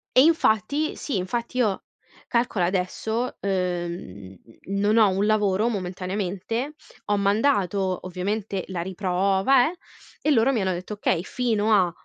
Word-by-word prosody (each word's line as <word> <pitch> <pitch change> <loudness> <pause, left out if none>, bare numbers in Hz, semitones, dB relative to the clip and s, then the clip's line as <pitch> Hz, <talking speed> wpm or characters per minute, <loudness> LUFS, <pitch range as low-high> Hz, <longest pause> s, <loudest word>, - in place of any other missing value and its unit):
E 255 - +8
infatti 290 -1 +2
Sì, 270 -9 -3
infatti 235 +7 -3
io 215 -6 +1 0.4
calcola, 235 -6 +1
adesso, 200 +6 -2
ehm, 175 - -3 0.3
n 200 +1 -2
non 210 +2 +3
ho 215 -3 +6
un 195 +2 0
lavoro, 210 0 +2
momentaneamente. 195 - -3 0.3
Ho 205 0 +1
mandato, 200 -3 +1
ovviamente, 190 +2 -3
la 180 -3 -3
riprova, 195 - +2
eh, - - -12 0.5
e 305 - 0
loro 255 -1 +4
mi 230 -6 0
hanno 190 - 0
detto: 180 +4 -5
"Okay 185 -4 0
fino 220 -2 0
a" 185 -4 +4
200 Hz, 140 wpm, -24 LUFS, 185-225 Hz, 0.5 s, E